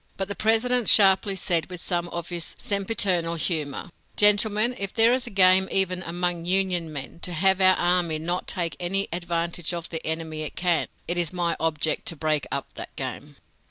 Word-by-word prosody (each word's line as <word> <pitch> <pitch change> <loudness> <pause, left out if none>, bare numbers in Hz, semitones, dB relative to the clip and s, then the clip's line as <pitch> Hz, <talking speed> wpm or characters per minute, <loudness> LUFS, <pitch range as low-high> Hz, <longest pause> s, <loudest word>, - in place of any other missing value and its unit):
But 195 0 -3
the - - -1
President 225 +2 +2
sharply 195 0 +6
said 170 -3 +2
with 180 -1 -8
some 175 -1 -2
of 170 -1 -6
his 175 -2 -6
sempiternal 190 -4 0
humor: 160 0 -3 0.3
"Gentlemen, 210 +3 +4
if 200 -1 -3
there 230 +1 +5
is 255 0 -2
a - - -3
game 190 -1 +4
even 185 -1 0
among 175 0 -3
Union 180 -3 0
men, 140 +2 -7
to 180 - -5
have 190 +3 +2
our 185 0 +6
army 175 -2 0
not 175 +3 -4
take 170 -4 -2
any 195 +3 -2
advantage 170 0 -3
of 170 -1 -5
the 165 - -4
enemy 160 -1 -4
it 155 - -6
can, 175 -3 0 0.2
it 175 +1 0
is 170 -3 0
my 175 -2 -1
object 160 -1 -2
to 170 - -2
break 155 -1 -1
up 140 - -4
that - - -9
game!" - - -7
175 Hz, 190 wpm, -24 LUFS, 165-195 Hz, 0.3 s, sharply